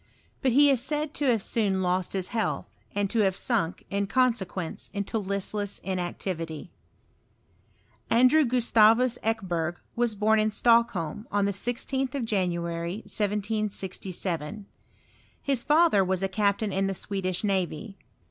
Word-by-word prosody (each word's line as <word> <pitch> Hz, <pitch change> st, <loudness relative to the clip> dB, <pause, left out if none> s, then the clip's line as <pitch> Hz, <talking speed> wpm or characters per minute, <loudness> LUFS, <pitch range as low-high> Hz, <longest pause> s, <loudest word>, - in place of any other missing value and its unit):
But 260 Hz, -3 st, +2 dB
he 285 Hz, +2 st, +6 dB
is 260 Hz, -4 st, +2 dB
said 295 Hz, +2 st, -2 dB
to 290 Hz, -, -2 dB
have 230 Hz, -6 st, +2 dB
soon 195 Hz, -4 st, 0 dB
lost 180 Hz, 0 st, 0 dB
his 190 Hz, -2 st, -2 dB
health, 225 Hz, -2 st, -1 dB, 0.3 s
and 205 Hz, 0 st, +1 dB
to 230 Hz, -, +1 dB
have 195 Hz, -3 st, +3 dB
sunk, 200 Hz, -7 st, -1 dB
in 200 Hz, 0 st, 0 dB
consequence, 195 Hz, -8 st, -1 dB
into 200 Hz, +3 st, -2 dB
listless 200 Hz, +1 st, -2 dB
inactivity. 175 Hz, -3 st, -4 dB, 1.4 s
Andrew 255 Hz, +7 st, +5 dB
Gustavus 240 Hz, -1 st, +4 dB
Ekeberg 180 Hz, -7 st, -1 dB, 0.2 s
was 235 Hz, -2 st, +1 dB
bom 215 Hz, +2 st, +3 dB
in 215 Hz, 0 st, +2 dB
Stockholm, 220 Hz, -5 st, +2 dB
on 205 Hz, -1 st, +2 dB
the 200 Hz, -, +1 dB
16th 255 Hz, +5 st, -2 dB
of 265 Hz, -4 st, -1 dB
January, 170 Hz, -1 st, -2 dB
1767. 200 Hz, -3 st, -3 dB, 0.7 s
His 275 Hz, -4 st, 0 dB
father 300 Hz, -, +4 dB
was 190 Hz, 0 st, -1 dB
a -, -, +2 dB
captain 200 Hz, +1 st, 0 dB
tn 195 Hz, +1 st, 0 dB
the 195 Hz, -, -2 dB
Swedish 185 Hz, -1 st, -2 dB
navy. 195 Hz, -1 st, -2 dB
205 Hz, 135 wpm, -27 LUFS, 185-235 Hz, 1.4 s, he